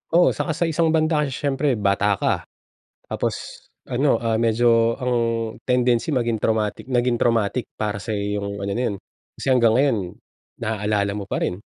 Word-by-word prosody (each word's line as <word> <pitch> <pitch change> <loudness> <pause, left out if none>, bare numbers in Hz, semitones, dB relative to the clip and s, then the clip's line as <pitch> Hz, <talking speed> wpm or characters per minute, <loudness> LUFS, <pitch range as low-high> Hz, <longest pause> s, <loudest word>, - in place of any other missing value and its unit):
Oo, 175 +1 +6
tsaka 160 - -2
sa 165 - 0
isang 165 0 +1
banda 155 -1 +2
kasi 140 -3 -1
siyempre 140 -1 0
bata 100 -1 +2
ka - - -1 0.6
tapos - - -4 0.2
ano, 130 0 +2
ah, 115 -1 -1
medyo 115 0 +3
ang 125 -2 -1 0.5
tendency 125 +2 +1
maging 120 -5 0
traumatic 110 +3 -1
naging 125 -1 +2
traumatic 115 0 +1
para 105 -2 -2
sa 100 - -6
iyo 105 0 -2
yung 100 0 -4
ano 100 0 -3
na 120 - -1
yun, 100 - -4 0.4
kasi - - -7
hanggang 120 -3 +4
ngayon 140 -4 +3 0.6
naaalala 105 -2 -1
mo 105 - -4
pa - - 0
rin. 90 +3 -2
115 Hz, 170 wpm, -22 LUFS, 105-130 Hz, 0.6 s, Oo